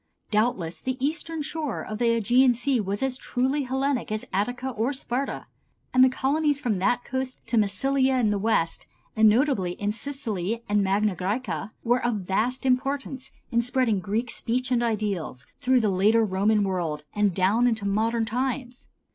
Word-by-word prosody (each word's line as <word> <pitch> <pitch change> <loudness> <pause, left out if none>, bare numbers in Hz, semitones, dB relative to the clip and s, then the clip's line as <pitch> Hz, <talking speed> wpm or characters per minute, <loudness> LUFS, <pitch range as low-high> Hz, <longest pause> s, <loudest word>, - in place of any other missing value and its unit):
Doubtless 210 -7 0
the 260 0 -2
eastern 315 +3 -2
shore 300 -4 -3
of 215 0 -6
the 240 - +1
Ægean 245 +3 +4
Sea 255 +2 0
was 200 +2 -2
as 265 -1 -1
truly 265 +3 0
Hellenic 265 -2 -1
as 215 0 -3
Attica 245 +7 -1
or 235 +4 -1
Sparta. 265 0 -3 0.5
And 255 0 +6
the 260 - +6
colonies 290 +3 +1
from 225 -9 -1
that 245 +6 +1
coast 260 0 -3
to 230 - -2
Massilia 260 +6 +2
in 220 -4 +2
the 205 - 0
west, 195 -6 0 0.3
and 220 -1 +6
notably 215 -6 +2
in 205 +3 -2
Sicily 230 -4 -4
and 205 0 +2
Magna 200 +1 +1
Græcia, 205 +3 -3
were 245 +1 +2
of 240 -2 +1
vast 220 +8 -1
importance 265 0 -1 0.2
in 235 -1 +3
spreading 240 -3 +1
Greek 220 +5 -2
speech 250 +3 -2
and 240 -1 +3
ideals 205 - -2
through 255 0 +3
the 215 - +2
later 210 +4 +3
Roman 205 +2 +2
world 170 -6 -2
and 210 -1 +2
down 205 +6 +3
into 220 -4 -1
modern 225 +3 +1
times. 250 +2 -3
235 Hz, 170 wpm, -25 LUFS, 205-260 Hz, 0.5 s, And